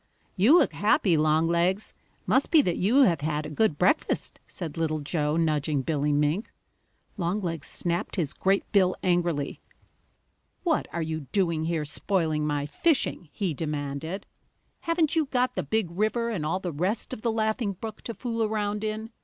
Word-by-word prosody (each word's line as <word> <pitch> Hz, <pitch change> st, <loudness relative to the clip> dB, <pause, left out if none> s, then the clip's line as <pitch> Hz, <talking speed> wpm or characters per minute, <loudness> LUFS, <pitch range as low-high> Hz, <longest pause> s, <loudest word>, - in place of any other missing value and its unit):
"You 225 Hz, -, +6 dB
look -, -, +3 dB
happy, 200 Hz, -3 st, +3 dB
Longlegs. 170 Hz, +5 st, +2 dB, 0.3 s
Must 265 Hz, -, +2 dB
be 315 Hz, -3 st, +6 dB
that 175 Hz, -, 0 dB
you 240 Hz, +9 st, +4 dB
have 170 Hz, -, +3 dB
had 150 Hz, 0 st, -1 dB
a 150 Hz, -, -6 dB
good 165 Hz, -2 st, +1 dB
breakfast," 185 Hz, -, +1 dB
said 165 Hz, -5 st, -6 dB
Little 160 Hz, -1 st, 0 dB
Joe, 150 Hz, +1 st, -1 dB
nudging 150 Hz, -3 st, +1 dB
Billy 150 Hz, 0 st, 0 dB
Mink. 150 Hz, +8 st, 0 dB, 0.7 s
Longlegs 170 Hz, -4 st, -2 dB
snapped 175 Hz, 0 st, -2 dB
his 165 Hz, -8 st, -1 dB
great 195 Hz, +1 st, +1 dB
bill 185 Hz, -3 st, +4 dB
angrily. 175 Hz, -5 st, 0 dB, 1.0 s
"What 330 Hz, -4 st, +1 dB
are 170 Hz, -, -2 dB
you 155 Hz, -3 st, -4 dB
doing 170 Hz, -5 st, +1 dB
here, 160 Hz, -2 st, -1 dB
spoiling 155 Hz, -1 st, 0 dB
my 145 Hz, -1 st, -1 dB
fishing?" 185 Hz, -, 0 dB
he 185 Hz, -2 st, -2 dB
demanded. 150 Hz, +4 st, -4 dB, 0.5 s
"Haven't 335 Hz, -2 st, +1 dB
you 315 Hz, -3 st, +2 dB
got 255 Hz, -2 st, +1 dB
the -, -, -1 dB
Big 220 Hz, -6 st, -1 dB
River 220 Hz, +5 st, 0 dB
and 165 Hz, -9 st, -2 dB
all 185 Hz, +4 st, 0 dB
the 180 Hz, -3 st, -4 dB
rest 185 Hz, +9 st, -1 dB
of -, -, -6 dB
the 230 Hz, -, +1 dB
Laughing 220 Hz, -1 st, 0 dB
Brook 220 Hz, +4 st, -8 dB
to 230 Hz, -, -6 dB
fool 230 Hz, -2 st, -3 dB
around 210 Hz, -1 st, -1 dB
in? 215 Hz, +1 st, -3 dB
175 Hz, 165 wpm, -27 LUFS, 155-215 Hz, 1.0 s, You